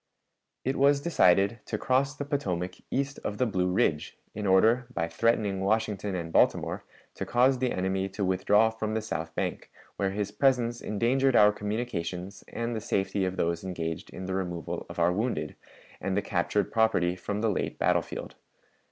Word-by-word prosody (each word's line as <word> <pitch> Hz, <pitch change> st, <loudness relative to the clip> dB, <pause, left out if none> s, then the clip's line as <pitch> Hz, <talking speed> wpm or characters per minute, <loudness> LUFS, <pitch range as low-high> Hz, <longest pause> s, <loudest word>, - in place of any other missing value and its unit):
It 135 Hz, +2 st, 0 dB
was 140 Hz, +1 st, +4 dB
decided 100 Hz, -, +3 dB
to -, -, -2 dB
cross 135 Hz, +3 st, +1 dB
the 145 Hz, -, -4 dB
Potomac 95 Hz, -, -2 dB
east 135 Hz, +1 st, -2 dB
of 105 Hz, -, -3 dB
the 125 Hz, -, +2 dB
Blue 95 Hz, -5 st, 0 dB
Ridge, 90 Hz, -7 st, 0 dB, 0.2 s
in 105 Hz, -1 st, -3 dB
order, 110 Hz, +6 st, +4 dB
by 85 Hz, 0 st, -1 dB
threatening 100 Hz, +2 st, +1 dB
Washington 105 Hz, -1 st, 0 dB
and 85 Hz, -2 st, -4 dB
Baltimore, -, -, +2 dB, 0.3 s
to -, -, -5 dB
cause 125 Hz, +2 st, +3 dB
the 130 Hz, -1 st, 0 dB
enemy 95 Hz, +1 st, -1 dB
to 95 Hz, +1 st, -2 dB
withdraw 105 Hz, +4 st, +3 dB
from 110 Hz, -1 st, -3 dB
the 110 Hz, -, 0 dB
south 80 Hz, -6 st, -4 dB
bank, -, -, -3 dB, 0.3 s
where 100 Hz, -, +1 dB
his 100 Hz, +1 st, -3 dB
presence 120 Hz, 0 st, +1 dB
endangered 125 Hz, +5 st, +1 dB
our 105 Hz, -1 st, +7 dB
communications 100 Hz, -4 st, -4 dB
and 115 Hz, 0 st, -3 dB
the 110 Hz, -, -3 dB
safety 95 Hz, -2 st, 0 dB
of 95 Hz, 0 st, -3 dB
those 85 Hz, 0 st, 0 dB
engaged 85 Hz, -3 st, -4 dB
in 95 Hz, -, -7 dB
the 95 Hz, -, -3 dB
removal 90 Hz, -3 st, -4 dB
of -, -, -9 dB
our 85 Hz, +1 st, +3 dB
wounded 95 Hz, -8 st, -2 dB, 0.4 s
and 95 Hz, 0 st, -2 dB
the 100 Hz, -, +1 dB
captured 100 Hz, +2 st, 0 dB
property 110 Hz, -6 st, +2 dB
from 100 Hz, +3 st, -4 dB
the 110 Hz, -, +2 dB
late -, -, -2 dB
battle -, -, +3 dB
field. -, -, -7 dB
105 Hz, 180 wpm, -28 LUFS, 95-115 Hz, 0.4 s, our